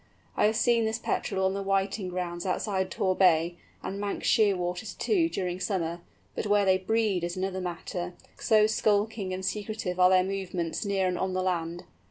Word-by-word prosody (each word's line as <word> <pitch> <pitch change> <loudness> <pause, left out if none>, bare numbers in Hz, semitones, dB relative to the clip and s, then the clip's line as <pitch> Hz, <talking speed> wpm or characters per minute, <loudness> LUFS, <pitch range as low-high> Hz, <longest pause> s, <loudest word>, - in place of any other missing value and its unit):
I - - +3
have 220 - 0
seen 230 0 +3
this 220 0 -1
Petrel 195 -4 -1
on 190 - +1
the 200 - -3
whiting 195 0 0
grounds 175 -1 -4
outside 190 0 -1
Tor 185 0 0
Bay, 170 -2 +3 0.3
and 195 - -4
Manx 205 0 -3
Shearwaters, 190 -2 +1
too, 345 -6 +2
during 180 - -3
summer; 175 -4 -2 0.3
but - - -3
where 205 -1 +3
they 190 -1 +4
breed 205 -2 0
is 175 +1 -3
another 190 0 -2
matter, 175 0 -4 0.3
so 215 -2 +4
skulking 215 -2 +1
and 185 +1 -4
secretive 205 -3 -3
are 180 0 +7
their 185 0 +5
movements 185 -3 -3
near 195 -2 +1
and 180 -1 -1
on 190 -1 -1
the 185 0 0
land. 175 -1 -2
190 Hz, 185 wpm, -28 LUFS, 180-205 Hz, 0.3 s, are